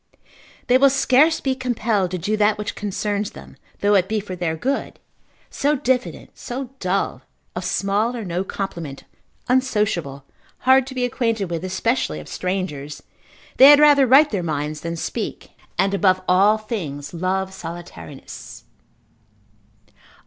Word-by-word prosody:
they 250 +1 +4
will 275 +1 +6
scarce 275 +4 +3
be 265 - 0
compelled 235 -7 -1
to 185 - -3
do 200 +5 -1
that 210 0 +2
which 210 - -4
concerns 205 0 -3
them, - - -13 0.3
though 205 +1 +3
it 190 -2 +3
be 220 0 0
for 195 -2 -7
their 170 -2 -2
good, 265 - -3 0.5
so 290 +2 +1
diffident, 255 -2 -2
so 255 +1 -6
dull, 190 +1 -1 0.3
of - - -4
small 205 +5 0
or 230 -3 -5
no 180 +1 -2
compliment, 170 -8 -6 0.4
unsociable, 210 - 0 0.4
hard 260 0 +4
to 265 - -8
be 250 -1 0
acquainted 230 -6 -1
with, 165 0 -3
especially 190 - -1
of 75 - -11
strangers; 165 -6 -4 0.5
they 270 +2 +10
had 290 0 +8
rather 290 -3 +6
write 280 +5 +6
their 200 -4 -1
minds 150 -2 -3
than 170 0 -4
speak, 165 - -5 0.3
and 195 0 +1
above 190 -2 +3
all 200 +4 +4
things 160 -10 -6
love 190 +2 -2
solitariness. 170 -6 -9
200 Hz, 145 wpm, -21 LUFS, 175-250 Hz, 0.5 s, they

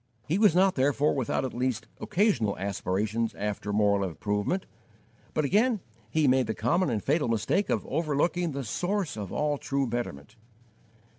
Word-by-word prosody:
He 170 +7 +1
was 210 -6 +5
not, 190 +1 +5
therefore, 145 +2 +2
without 130 -1 -1
at 130 - -4
least 125 -2 -1
occasional 170 - +1
aspirations 100 +3 -1
after 105 0 -3
moral 100 -1 +3
improvement; 105 - -1 0.7
but 155 - +2
again 215 - +3 0.3
he 150 +5 +2
made 130 -2 +3
the 110 - -2
common 170 - +1
and 110 -4 -1
fatal 145 0 +1
mistake 115 - +1
of - - 0
overlooking 165 +3 0
the 140 -1 -4
Source 180 - -2
of 105 -3 -6
all 150 -1 0
true 140 0 -1
betterment. 115 - -5
130 Hz, 155 wpm, -28 LUFS, 105-165 Hz, 0.7 s, was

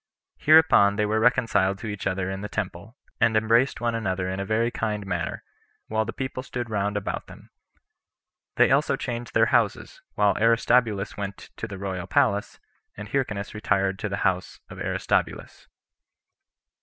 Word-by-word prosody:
Hereupon 155 -10 +6
they 105 0 +1
were 110 +1 +1
reconciled 110 -5 +2
to 110 - -7
each 105 -2 -4
other 95 -1 -1
in 95 0 -4
the 105 - -5
temple, 105 +3 -5 0.2
and 115 -2 +3
embraced 115 +5 +2
one 120 -1 0
another 95 -5 -2
in 95 - -4
a 100 - -2
very 115 +3 +1
kind 105 -3 -3
manner, 85 -3 -3 0.5
while 110 0 0
the - - -4
people 130 -1 -4
stood 120 -3 -5
round 105 0 -1
about 100 - -4
them; - - -15 1.0
they - - +4
also - - +3
changed 120 -1 -5
their - - +5
houses, - - 0
while 105 -1 +3
Aristobulus 115 -2 +2
went 100 -1 -6
to 115 - -5
the 100 -3 -7
royal 95 -2 -4
palace, 105 0 +1 0.4
and 105 0 -8
Hyrcanus 105 -7 -2
retired 100 -2 0
to 110 - -3
the 100 - -3
house 90 -1 -1
of - - -9
Aristobulus. - - -2
105 Hz, 165 wpm, -25 LUFS, 100-115 Hz, 1.0 s, Hereupon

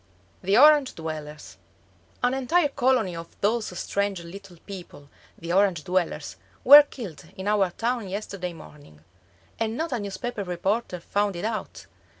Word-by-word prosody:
] 95 - -35
THE 195 +3 +2
ORANGE 295 -1 +6
DWELLERS 155 -2 -7 0.7
An 245 +1 +3
entire 290 +5 +2
colony 250 -9 +1
of 165 0 -10
those 220 +2 +1
strange 200 0 -1
little 185 +1 -11
people, 175 -7 -10 0.3
the 170 +1 -4
Orange 190 -5 +2
dwellers, 170 - -2 0.3
were 290 +3 +11
killed 220 - -9
in 190 +1 -5
our 205 -3 +2
town 230 +2 -2
yesterday 190 -2 -5
morning. 145 - -15 0.6
And 225 +1 -1
not 325 0 -2
a 245 - -1
newspaper 205 +2 -4
reporter 185 +1 -2
found 205 +1 -1
it 175 - -4
out! 220 -1 -5
200 Hz, 150 wpm, -25 LUFS, 175-235 Hz, 0.7 s, were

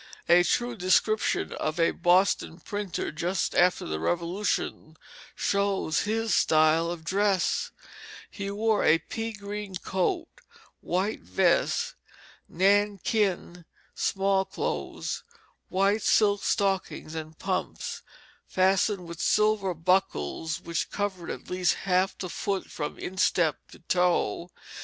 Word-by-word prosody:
A 175 +1 +7
true 240 +6 0
description 210 +3 +1
of 155 +2 -3
a 165 - +4
Boston 175 -1 +2
printer 205 +1 -4
just 170 +3 -1
after 180 +1 +3
the 80 0 -3
Revolution 170 - -2 0.4
shows 200 -5 0
his 225 +1 0
style 155 +1 +4
of 170 -2 -5
dress: 195 +1 +1 0.6
"He 200 -1 -5
wore 215 +1 +1
a 160 - +5
pea 225 +6 -5
green 205 -2 -6
coat, 190 - -1 0.5
white 190 +5 -1
vest, 90 +1 +1 0.6
nankeen 200 -1 +1 0.3
small 195 0 +1
clothes, - - -4 0.5
white 200 +3 +2
silk 205 -1 +3
stockings, 195 -5 -1
and 160 -1 -7
pumps 190 -1 -3 0.5
fastened 190 0 +1
with 170 0 -7
silver 210 -2 +2
buckles 160 - 0
which 170 0 -2
covered 195 -4 -3
at - - -6
least 180 -1 +2
half 185 0 +1
the 185 - -4
foot 195 +2 -2
from 150 -2 -4
instep 180 -3 +1
to - - -14
toe. 180 0 0
185 Hz, 115 wpm, -27 LUFS, 170-205 Hz, 0.6 s, A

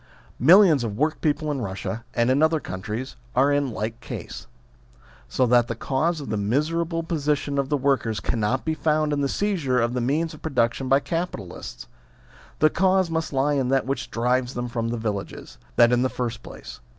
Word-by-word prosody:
Millions 165 - +6
of 105 -3 -4
workpeople 155 0 0
in 140 - -2
Eussia, 105 +1 -4
and 120 +1 +2
in 135 +3 +2
other 160 0 +3
countries, 110 +4 -6 0.2
are 140 +3 +4
in 145 -1 +1
like 110 +1 -4
case. - - -8 0.8
So 125 - +1
that 120 -1 +4
the 115 - -3
cause 155 +8 -1
of 140 - -7
the 110 - 0
miserable 165 - 0
position 145 -3 -1
of 135 -1 -1
the 145 - +2
workers 130 -6 0
cannot 115 +4 -1
be 160 - 0
found 155 -1 +1
in 145 - 0
the 140 - 0
seizure 165 -12 0
of 120 +1 0
the 125 - -1
means 155 +7 0
of 155 - -13
production 130 -3 0
by 135 +1 +4
capitalists. 105 - -5 0.7
The 155 0 +4
cause 190 -1 +2
must 160 -1 -2
lie 140 +1 +1
in 135 -3 +1
that 135 -1 +2
which 135 +1 -3
drives 125 +2 0
them 120 0 -3
from 115 -1 -2
the 120 +1 -2
villages. 100 - -5 0.2
That 120 0 +6
in 125 0 +3
the 130 - +1
first 120 -3 -4
place. - - -10
135 Hz, 190 wpm, -24 LUFS, 120-155 Hz, 0.8 s, Millions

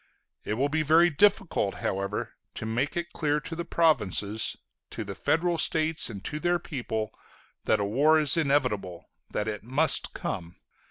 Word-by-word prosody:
It 105 - -2
will 135 +5 +1
be 155 +2 0
very 165 +3 +5
difficult, 170 - +2
however, 100 +3 -3 0.2
to - - -5
make 120 +8 -1
it 170 -1 -4
clear 150 -1 0
to 165 - -6
the 170 - -3
provinces, 110 - +2 0.3
to 115 - -5
the 100 -1 -6
federal 165 - 0
states 160 -2 0
and 100 -4 -8
to 150 - -3
their 175 +2 +1
people, 110 -8 -4 0.5
that - - +2
a 100 - 0
war 145 +9 +4
is 150 -2 +6
inevitable, 125 - -1 0.2
that 105 - -2
it 105 -1 -4
must 135 +7 +1
come. 85 0 -5
140 Hz, 165 wpm, -27 LUFS, 105-160 Hz, 0.5 s, is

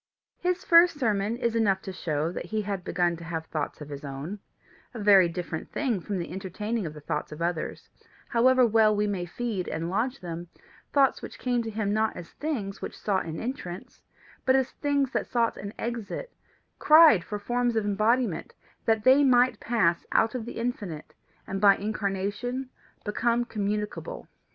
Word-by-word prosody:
His 360 0 -1
first 335 -1 +6
sermon 215 -2 0
is 235 -2 -1
enough 200 -4 +2
to 190 - -6
show 155 -2 -1
that - - -5
he 220 -1 -1
had 195 -2 -3
begun 175 -1 +1
to 170 - -10
have 165 -1 -4
thoughts 155 -1 -4
of 150 - -8
his 145 0 -7
own 145 +8 -6 0.6
a - - -5
very 200 -4 +6
different 170 -2 -5
thing 245 -9 0
from 200 +3 -3
the 170 - -5
entertaining 195 +2 -3
of 155 - -8
the 150 - -10
thoughts 150 +1 -3
of 150 - -8
others, 170 -1 -3 0.4
however 255 +2 +5
well 220 -1 +4
we 210 0 +1
may 195 -4 -2
feed 200 0 -3
and 165 +2 -3
lodge 250 +7 -1
them 170 -1 -6 0.4
thoughts 275 -2 +3
which - - -8
came 245 -1 0
to 225 - -4
him 210 -2 -1
not 220 +1 0
as 170 - -9
things 220 -11 -4
which - - -6
sought 195 -3 0
an 160 -1 -5
entrance, 225 -8 -6 0.4
but 260 - +4
as 265 -1 +1
things 280 -2 0
that - - -1
sought 235 -2 +1
an 200 +1 -6
exit 235 - -5 0.5
cried 305 - +7
for 210 - -4
forms 240 +3 0
of 220 -2 +1
embodiment 215 0 +1 0.3
that 220 -1 +2
they 265 +4 +6
might 250 -3 +4
pass 175 -8 +1
out 225 - +3
of 245 -3 -4
the - - -6
infinite, 210 -10 -4 0.3
and 195 0 -4
by 200 -1 +7
incarnation 210 +5 -3 0.3
become 235 +3 +1
communicable. 210 - -3
210 Hz, 180 wpm, -27 LUFS, 180-245 Hz, 0.6 s, cried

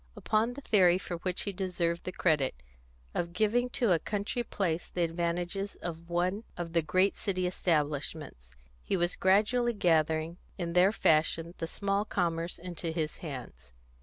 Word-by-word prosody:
Upon 220 +3 +1
the 280 - -8
theory, 185 -8 +5
for 180 -2 -5
which 180 +1 -1
he 200 - -2
deserved 175 -2 -1
the 185 - -2
credit, 155 - +1 0.6
of 170 0 -2
giving 225 +5 +2
to 240 -7 +3
a 170 - +4
country 205 +6 -2
place 175 -7 -1
the 175 - -1
advantages 175 +4 -2
of 170 -1 -6
one 180 +5 0
of 170 -1 -5
the 170 - +4
great 185 +6 +2
city 185 -3 -1
establishments, 150 - -2 0.3
he 195 - -1
was 175 0 +1
gradually 220 +6 +3
gathering, 160 -3 +2 0.2
in 170 -2 -3
their 180 +3 +5
fashion, 165 -2 +2
the 165 - -2
small 200 +3 0
commerce 170 -4 -1
into 175 -1 -5
his 160 -2 -2
hands. 125 - -8
175 Hz, 160 wpm, -30 LUFS, 165-195 Hz, 0.6 s, theory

